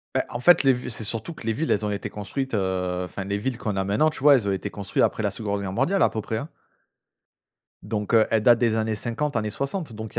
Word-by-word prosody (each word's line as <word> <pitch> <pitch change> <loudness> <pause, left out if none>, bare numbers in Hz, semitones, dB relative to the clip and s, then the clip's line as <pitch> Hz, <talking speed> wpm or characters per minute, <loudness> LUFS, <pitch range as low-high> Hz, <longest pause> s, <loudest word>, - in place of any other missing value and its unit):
Beh, - - +3
en 120 - -5
fait 175 +5 +6
les 135 - +6
vi 125 0 -3
c'est 110 - -3
surtout 115 +9 -1
que 115 - -12
les 115 - +1
villes 155 +9 -1
elles 105 0 +1
ont 105 - -1
été 105 0 -4
construites 130 +6 -5
heu, 90 -2 -1
enfin 95 +2 -6
les 100 +1 -1
villes 120 +3 -3
qu'on 105 -4 -3
a 95 - 0
maintenant, 105 +11 +2
tu 150 - -9
vois 145 -1 +7
elles 110 -6 0
ont 100 - +1
été 95 - -3
construits 100 -1 -2
après 110 - +1
la 100 - +2
2de 100 0 -3
guerre 95 -1 -4
mondiale 170 - +1
à - - +5
peu 110 - -4
près, 110 +2 -3
hein 140 - -5 1.4
donc 105 -1 -3
heu, 110 -1 +5
elles 110 -1 +2
datent 120 -1 +6
des 115 -3 +2
années 110 0 0
50, 125 +6 -3
années 105 -1 0
60, 140 - -3
donc 110 0 -8
il - - -8
110 Hz, 275 wpm, -24 LUFS, 100-125 Hz, 1.4 s, vois